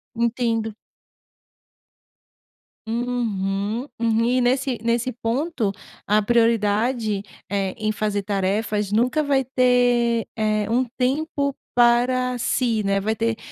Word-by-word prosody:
Entendo. 230 Hz, -2 st, 0 dB, 2.1 s
Uhum, 225 Hz, -1 st, -2 dB
uhum. 230 Hz, 0 st, +2 dB
E 250 Hz, +1 st, +2 dB
nesse 255 Hz, 0 st, +1 dB
nesse 235 Hz, +2 st, 0 dB
ponto 240 Hz, 0 st, -1 dB, 0.4 s
a 210 Hz, +1 st, +3 dB
prioridade, 225 Hz, -1 st, +1 dB, 0.3 s
eh, 195 Hz, -2 st, -1 dB
em 215 Hz, 0 st, -1 dB
fazer 210 Hz, -1 st, -2 dB
tarefas, 205 Hz, +1 st, -1 dB
nunca 250 Hz, +7 st, +2 dB
vai 280 Hz, -2 st, +1 dB
ter, 245 Hz, -2 st, +2 dB
eh, 215 Hz, -1 st, 0 dB
um 250 Hz, +3 st, +2 dB
tempo 280 Hz, +1 st, 0 dB, 0.2 s
para 245 Hz, +1 st, +3 dB
si, 230 Hz, -2 st, 0 dB
né, 195 Hz, 0 st, +1 dB
vai 220 Hz, +3 st, -1 dB
ter 230 Hz, 0 st, -1 dB
230 Hz, 105 wpm, -22 LUFS, 215-250 Hz, 2.1 s, a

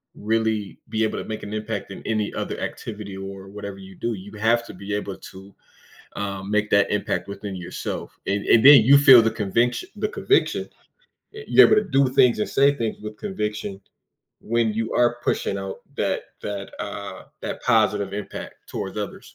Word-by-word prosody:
really 110 Hz, -1 st, -1 dB
be 110 Hz, 0 st, 0 dB
able 110 Hz, -, -1 dB
to -, -, -4 dB
make 110 Hz, -1 st, -6 dB
an 105 Hz, -, -6 dB
impact 110 Hz, +1 st, -4 dB
in -, -, -8 dB
any 110 Hz, -2 st, -1 dB
other -, -, -4 dB
activity, 105 Hz, -3 st, -6 dB
or 95 Hz, 0 st, -8 dB
whatever 100 Hz, 0 st, -7 dB
you 95 Hz, -1 st, -12 dB
do, 120 Hz, -1 st, -2 dB
you 100 Hz, +2 st, -11 dB
have 115 Hz, +2 st, +2 dB
to -, -, -10 dB
be 100 Hz, +1 st, -6 dB
able 100 Hz, -2 st, -4 dB
to, 95 Hz, +1 st, -13 dB, 0.6 s
um, 100 Hz, -1 st, -4 dB
make 105 Hz, 0 st, +1 dB
that 100 Hz, 0 st, +4 dB
impact 105 Hz, -, -1 dB
within 100 Hz, 0 st, -6 dB
yourself. 90 Hz, -2 st, -6 dB
And 100 Hz, 0 st, 0 dB
and 115 Hz, +2 st, +5 dB
then, 140 Hz, -2 st, +11 dB
you 140 Hz, +5 st, +7 dB
feel 135 Hz, -4 st, +9 dB
the 115 Hz, -, +2 dB
conviction 115 Hz, -, 0 dB
the -, -, 0 dB
conviction, 410 Hz, -3 st, +1 dB, 0.7 s
eh, 435 Hz, -, -8 dB
you're -, -, +8 dB
able 430 Hz, -, +4 dB
to -, -, -10 dB
do 135 Hz, -1 st, +4 dB
things 125 Hz, -3 st, +4 dB
and 105 Hz, -, -1 dB
say 140 Hz, +1 st, +4 dB
things 115 Hz, -3 st, -2 dB
with 105 Hz, 0 st, -7 dB
conviction 105 Hz, -, -4 dB, 0.6 s
when 115 Hz, -1 st, 0 dB
you 110 Hz, +1 st, -2 dB
are 120 Hz, 0 st, +3 dB
pushing 100 Hz, -, 0 dB
out 95 Hz, 0 st, -6 dB, 0.2 s
that -, -, 0 dB, 0.2 s
that, 100 Hz, -1 st, -5 dB
uh, -, -, -6 dB, 0.2 s
that -, -, -4 dB
positive 105 Hz, -4 st, +2 dB
impact 105 Hz, 0 st, -6 dB
towards -, -, -5 dB
others. -, -, -7 dB
105 Hz, 185 wpm, -23 LUFS, 100-115 Hz, 0.7 s, then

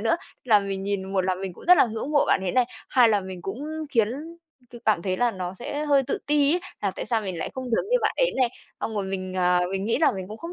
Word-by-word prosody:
nữa. 225 Hz, +8 st, +2 dB, 0.3 s
Là 220 Hz, -4 st, +6 dB
mình 195 Hz, -1 st, -4 dB
nhìn 195 Hz, -1 st, -3 dB
một 195 Hz, -, +2 dB
là 185 Hz, 0 st, 0 dB
mình 190 Hz, 0 st, -5 dB
cũng -, -, -14 dB
rất 360 Hz, +1 st, +8 dB
là -, -, +5 dB
ngưỡng 225 Hz, +5 st, -4 dB
mộ 290 Hz, -, +4 dB
bạn -, -, +3 dB
ấy 180 Hz, -, -1 dB
này, 255 Hz, -1 st, +4 dB, 0.2 s
hai 245 Hz, -3 st, +5 dB
là 210 Hz, -2 st, +3 dB
mình 185 Hz, -2 st, -8 dB
cũng 225 Hz, +11 st, -5 dB, 0.3 s
khiến 225 Hz, -5 st, +3 dB, 0.6 s
c -, -, -9 dB
cảm 210 Hz, -6 st, +2 dB
thấy 185 Hz, 0 st, -1 dB
là 240 Hz, +4 st, +2 dB
nó 185 Hz, -3 st, -5 dB
sẽ 290 Hz, +8 st, -4 dB
hơi 280 Hz, -2 st, +4 dB
tự -, -, -1 dB
ti 290 Hz, 0 st, +3 dB
ấy 360 Hz, -, 0 dB, 0.2 s
là 200 Hz, -, +1 dB
tại -, -, -6 dB
sao 225 Hz, 0 st, +1 dB
mình 190 Hz, -5 st, -5 dB
lại -, -, -3 dB
không 260 Hz, -, -4 dB
giống 235 Hz, -, 0 dB
như -, -, +5 dB
bạn -, -, +1 dB
ấy -, -, +2 dB
này, 255 Hz, -2 st, +3 dB, 0.3 s
xong 220 Hz, -, -3 dB
rồi 205 Hz, -2 st, -1 dB
mình, 185 Hz, -1 st, -4 dB
à, 180 Hz, -1 st, +3 dB
mình 195 Hz, 0 st, -2 dB
nghĩ 225 Hz, -, +1 dB
là 320 Hz, -, +4 dB
mình 190 Hz, -1 st, -6 dB
cũng 215 Hz, -, -8 dB
không 335 Hz, +6 st, -7 dB
210 Hz, 290 wpm, -25 LUFS, 190-255 Hz, 0.6 s, rất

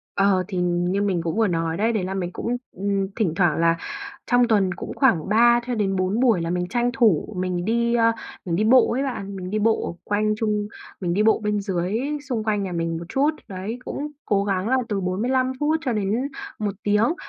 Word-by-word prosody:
Ờ, 195 Hz, -2 st, +3 dB
thì 190 Hz, -, -4 dB
như 175 Hz, +2 st, 0 dB
mình 190 Hz, -4 st, 0 dB
cũng 165 Hz, +5 st, -2 dB
vừa 225 Hz, -, +3 dB
nói 165 Hz, -1 st, -1 dB
đấy, 225 Hz, +3 st, +2 dB
đấy 205 Hz, -4 st, 0 dB
là 190 Hz, -, -3 dB
mình 180 Hz, -2 st, -3 dB
cũng, 245 Hz, +1 st, -2 dB
ừm, 195 Hz, +1 st, -1 dB
thỉnh 195 Hz, -9 st, 0 dB
thoảng 175 Hz, -4 st, +2 dB
là 165 Hz, 0 st, +3 dB, 0.5 s
trong 245 Hz, -1 st, +3 dB
tuần 200 Hz, -5 st, +2 dB
cũng 175 Hz, -, -7 dB
khoảng 210 Hz, -, +2 dB
3 235 Hz, +3 st, +5 dB
cho 245 Hz, -, -1 dB
đến 195 Hz, -3 st, 0 dB
4 185 Hz, +4 st, 0 dB
buổi 235 Hz, -8 st, +3 dB
là 165 Hz, -, -2 dB
mình 180 Hz, 0 st, -1 dB
tranh 240 Hz, +4 st, +1 dB
thủ 215 Hz, -4 st, +2 dB
mình 180 Hz, -1 st, -2 dB
đi, 235 Hz, +1 st, +1 dB
ơ, 230 Hz, -1 st, +4 dB, 0.3 s
mình 170 Hz, -2 st, -1 dB
đi 210 Hz, -, +1 dB
bộ 250 Hz, +4 st, +5 dB
ấy 260 Hz, +4 st, 0 dB
bạn, 200 Hz, -7 st, -4 dB
mình 185 Hz, -1 st, -6 dB
đi 215 Hz, +1 st, -1 dB
bộ 220 Hz, -5 st, 0 dB
quanh 215 Hz, +1 st, +1 dB
chung 210 Hz, -2 st, 0 dB, 0.3 s
mình 175 Hz, -2 st, 0 dB
đi 205 Hz, +4 st, +2 dB
bộ 220 Hz, +1 st, +4 dB
bên 210 Hz, 0 st, 0 dB
dưới 190 Hz, +2 st, -1 dB, 0.3 s
xung 225 Hz, -4 st, -1 dB
quanh 210 Hz, -2 st, 0 dB
nhà 190 Hz, -, -4 dB
mình 165 Hz, -1 st, -2 dB
một 170 Hz, -, -7 dB
chút, 280 Hz, +3 st, +2 dB, 0.2 s
đấy, 200 Hz, +5 st, -5 dB
cũng 295 Hz, -, -4 dB, 0.2 s
cố 200 Hz, -2 st, +2 dB
gắng 195 Hz, 0 st, -1 dB
là 260 Hz, +1 st, +3 dB
từ 200 Hz, -2 st, 0 dB
45 245 Hz, +8 st, 0 dB
phút 310 Hz, +2 st, +2 dB
cho 250 Hz, -, +1 dB
đến 215 Hz, +6 st, 0 dB, 0.3 s
1 205 Hz, -1 st, -1 dB
tiếng. 210 Hz, +7 st, +3 dB
205 Hz, 225 wpm, -23 LUFS, 185-230 Hz, 0.5 s, 3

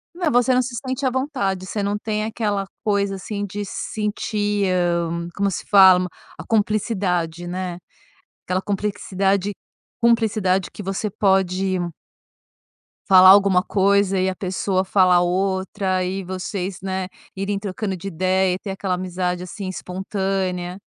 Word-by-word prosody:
Não, 350 Hz, -3 st, 0 dB
você 245 Hz, +2 st, +3 dB
não 255 Hz, -, +4 dB
se 250 Hz, 0 st, -5 dB
sente 260 Hz, +2 st, -2 dB
à 260 Hz, -, +4 dB
vontade, 245 Hz, -9 st, -2 dB
você 205 Hz, +2 st, -3 dB
não 200 Hz, +1 st, -1 dB
tem 215 Hz, 0 st, -2 dB
aquela 210 Hz, -3 st, -1 dB, 0.2 s
coisa 200 Hz, -2 st, +1 dB
assim 205 Hz, +2 st, -4 dB
de 205 Hz, +1 st, -5 dB
se 195 Hz, -, -6 dB
sentir, 205 Hz, -1 st, -1 dB
hã, 170 Hz, -1 st, 0 dB
como 200 Hz, 0 st, +1 dB
se 185 Hz, -, -5 dB
fala, 185 Hz, -2 st, +7 dB, 0.3 s
a -, -, -7 dB
cumplicidade, 190 Hz, -6 st, 0 dB
né? 180 Hz, -1 st, -4 dB, 0.7 s
Aquela 185 Hz, +1 st, 0 dB
complexidade 200 Hz, -1 st, -1 dB, 0.5 s
cumplicidade 215 Hz, -5 st, +2 dB
que -, -, -8 dB
você 195 Hz, +2 st, -2 dB
pode 190 Hz, -1 st, +1 dB, 1.3 s
falar 185 Hz, -1 st, +9 dB
alguma 195 Hz, -2 st, +6 dB
coisa 200 Hz, -1 st, +2 dB
e 185 Hz, -, +2 dB
a 185 Hz, -, -4 dB
pessoa 185 Hz, 0 st, -1 dB
falar 185 Hz, -2 st, +4 dB
outra 190 Hz, +1 st, 0 dB
e 190 Hz, +1 st, -3 dB
vocês, 185 Hz, +1 st, -4 dB
né, 190 Hz, -1 st, -3 dB, 0.3 s
irem 195 Hz, +1 st, -2 dB
trocando 195 Hz, -1 st, -3 dB
de 195 Hz, -, -7 dB
ideia 185 Hz, +1 st, +1 dB
e 185 Hz, -, -7 dB
ter 200 Hz, -, -7 dB
aquela 190 Hz, -1 st, -2 dB
amizade, 180 Hz, 0 st, -2 dB
assim, 190 Hz, +2 st, -6 dB
espontânea. 185 Hz, 0 st, -3 dB
195 Hz, 145 wpm, -22 LUFS, 185-205 Hz, 1.3 s, falar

